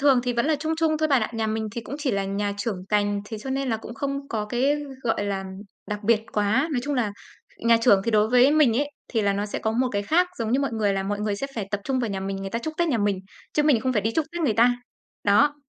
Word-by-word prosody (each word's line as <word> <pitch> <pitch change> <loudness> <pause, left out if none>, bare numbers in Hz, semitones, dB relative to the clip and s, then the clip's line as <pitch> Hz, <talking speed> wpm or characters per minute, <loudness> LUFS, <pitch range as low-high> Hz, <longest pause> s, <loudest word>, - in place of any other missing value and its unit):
Thường 275 -3 +5
thì 245 0 -1
vẫn 235 +4 0
là 315 - +2
chung 315 +2 -2
chung 315 -1 +1
thôi 310 0 +1
bạn 270 -5 +3
ạ. - - -2
Nhà 225 -1 -1
mình 220 0 -2
thì 235 - -4
cũng 245 - -7
chỉ 290 -4 0
là 200 -2 0
nhà 200 +1 -2
trưởng 200 -3 -3
cành, 205 -1 +1
thế 215 +1 -6
cho 265 +5 -6
nên 270 0 -1
là 225 - +1
cũng 225 +1 -9
không 275 +3 -3
có 215 -2 -2
cái, 260 +6 +1 0.3
gọi 225 -3 0
là, 195 -1 -2 0.4
đặc 210 -1 -3
biệt 225 0 +4
quá. 215 +8 +2
Nói 255 - +1
chung 290 +2 -2
là 230 -6 0 0.5
nhà 230 0 +4
trưởng 215 -5 +5
thì 230 - +1
đối 215 0 +3
với 250 +3 +6
mình 295 -7 +4
ấy, 290 +2 0 0.2
thì 225 -3 0
là 200 -1 +2
nó 200 +1 -2
sẽ 205 - -4
có 220 - -1
một 250 +3 +1
cái 200 -1 0
khác 355 - +2
giống 230 -1 -1
như 265 - +3
mọi 275 - -1
người, 215 -3 +1
là 195 0 -1
mọi 205 +1 -2
người 210 -1 -1
sẽ 275 - -3
phải 205 -4 -4
tập 205 - -1
trung 265 -1 0
vào 235 -4 -1
nhà 195 - -3
mình, 195 0 -3
người 195 0 -5
ta 230 - -1
chúc 310 +7 -5
Tết 340 -1 +2
nhà 250 -7 +1
mình, 205 -2 +1 0.3
chứ 300 - +2
mình 290 -6 +4
không 260 +1 0
phải 210 -4 +1
đi 225 - +1
chúc 320 -2 +1
Tết 345 - -4
người 270 -10 +2
ta. 245 +2 +4 0.5
Đó. 275 +9 +4
230 Hz, 300 wpm, -25 LUFS, 205-275 Hz, 0.5 s, với